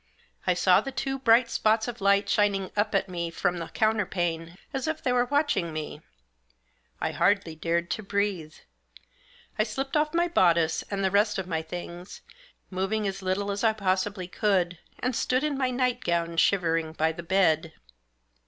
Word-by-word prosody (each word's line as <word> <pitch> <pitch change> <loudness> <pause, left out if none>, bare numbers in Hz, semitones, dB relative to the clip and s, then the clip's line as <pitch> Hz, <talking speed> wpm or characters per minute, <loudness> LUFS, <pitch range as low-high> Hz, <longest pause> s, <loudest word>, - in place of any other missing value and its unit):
I - - +3
saw 180 +1 +4
the 270 - -5
two 270 0 -3
bright 235 -1 +5
spots 220 +1 +1
of 240 -2 -6
light 200 +1 +3
shining 200 -2 +1
up 210 0 0
at 195 0 +1
me 170 -2 -3
from 175 +1 -1
the 165 - -5
counterpane 175 -6 -1 0.2
as 270 +2 -2
if 315 0 -2
they 255 - +1
were 245 0 +3
watching 285 - 0
me. 155 -1 -6 1.0
I - - -1
hardly 200 -5 +1
dared 170 +2 -1
to - - -2
breathe. 195 -6 -2 1.0
I - - +5
slipped 270 +6 -4
off 300 +2 +1
my 345 +1 +3
bodice, 170 - +3
and 195 -1 -2
the 190 - +1
rest 210 +2 +2
of 190 - -3
my 165 -3 -2
things, 175 +2 -8 0.5
moving 195 +3 -1
as 195 0 -4
little 190 +2 -1
as 200 +2 -3
I 220 -1 +4
possibly 190 -2 -1
could, 180 -3 0 0.2
and 250 -1 -2
stood 255 +3 +1
in 300 -1 0
my 265 -1 0
night 250 -1 0
gown 170 -1 0
shivering 165 -3 +2
by 160 0 +1
the 165 +2 -7
bed. 165 -3 +2
195 Hz, 175 wpm, -27 LUFS, 170-220 Hz, 1.0 s, bright